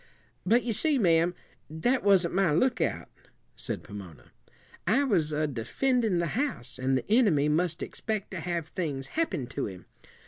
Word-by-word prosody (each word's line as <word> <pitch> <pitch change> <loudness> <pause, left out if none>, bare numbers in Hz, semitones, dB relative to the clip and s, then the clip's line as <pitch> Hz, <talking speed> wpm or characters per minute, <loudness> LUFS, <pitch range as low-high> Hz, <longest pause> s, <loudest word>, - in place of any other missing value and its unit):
"But 235 +5 +4
you 235 - -1
see, 285 +7 +2
ma'am, 170 -4 +3 0.3
that 240 - 0
wasn't 190 -4 +4
my 190 -3 +3
lookout," 235 - +1 0.5
said - - -5
Pomona. 90 -11 -11 0.6
"I 240 +9 +4
was 175 - +1
a 155 +1 0
defendin' 190 - 0
the 170 -2 -1
house, 150 - -4
and 130 +1 +1
the 130 - -5
enemy 200 - +4
must 165 +2 +1
expect 215 -3 -4
to 185 - -4
have 170 -1 -3
things 140 -7 -4
happen 315 - -1
to - - -3
him. 95 -3 -10
175 Hz, 160 wpm, -28 LUFS, 150-220 Hz, 0.6 s, But